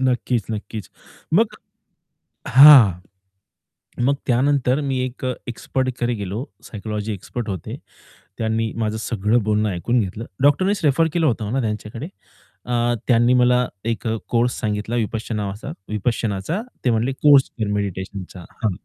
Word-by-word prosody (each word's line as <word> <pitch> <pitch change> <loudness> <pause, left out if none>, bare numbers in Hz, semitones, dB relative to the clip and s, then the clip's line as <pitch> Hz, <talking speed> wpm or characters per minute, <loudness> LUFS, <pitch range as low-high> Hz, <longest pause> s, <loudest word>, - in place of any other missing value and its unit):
नक्कीच, 125 -3 0
नक्कीच. 110 -1 -6 0.4
मग 220 +4 +3 0.9
हां. 135 -6 +9 1.2
मग 140 - +2
त्यानंतर 135 +1 +2
मी 130 - 0
एक 130 0 -6 0.2
एक्सपर्टकडे 120 0 -2
गेलो. 100 -1 -4 0.3
सायकॉलॉजी 105 0 -5
एक्सपर्ट 110 +4 -6
होते. 95 -5 -5 0.6
त्यांनी 110 0 -1
माझं 110 -1 -1
सगळं 110 +1 0
बोलणं 105 0 +1
ऐकून 115 +7 0
घेतलं. 100 +3 -4 0.2
डॉक्टरनीच 185 +8 +3
रेफर 150 +3 +3
केलं 165 -2 +1
होतं 110 -4 -1
ना 135 - +1
त्यांच्याकडे 110 +5 -4 0.6
अ, 120 0 +1
त्यांनी 120 +1 +4
मला 125 0 +4 0.2
एक 115 +1 -2
अ, 110 - 0
कोर्स 120 +1 +1
सांगितला 110 +1 -2
विपश्च 115 0 -2
नावाचा 105 -1 -4 0.2
विपश्यनाचा 110 - -1 0.2
ते 125 - +3
म्हणले 115 +4 +1
कोर्स 140 0 +5
कर 110 - 0
मेडिटेशनचा. 95 -2 -4 0.2
हां. 110 - +2
115 Hz, 130 wpm, -21 LUFS, 105-130 Hz, 1.2 s, हां